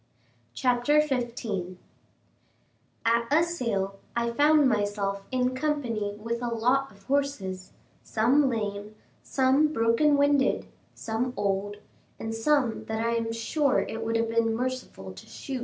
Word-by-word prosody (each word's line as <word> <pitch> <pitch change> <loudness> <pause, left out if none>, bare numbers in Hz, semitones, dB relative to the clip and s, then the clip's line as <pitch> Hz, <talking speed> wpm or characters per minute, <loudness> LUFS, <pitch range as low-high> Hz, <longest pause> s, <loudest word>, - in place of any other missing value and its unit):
CHAPTER 250 +4 +3
XV 235 -10 -2 1.3
At 230 0 +2
a 315 +3 +5
sale 210 - -2 0.2
I 235 0 0
found 295 +3 +4
myself 205 -3 -1
in 255 -1 0
company 250 -8 -2
with 230 +2 -4
a 245 - -2
lot 250 +3 +1
of 200 -1 -20
horses 210 -9 -2 0.3
some 260 +6 +2
lame, 210 -2 -4 0.3
some 270 +3 +3
broken 285 +2 +3
winded, 285 -1 +2 0.3
some 240 +3 -2
old, 205 0 -1 0.4
and 225 0 -4
some 245 0 +1
that 220 0 -3
I 230 - +1
am 230 -1 -1
sure 265 +5 +1
it 225 0 -5
would 225 0 -1
have 230 0 +1
been 230 0 +1
merciful 250 - -4
to 95 - -13
shoot. 270 -2 -6
235 Hz, 135 wpm, -27 LUFS, 215-270 Hz, 1.3 s, a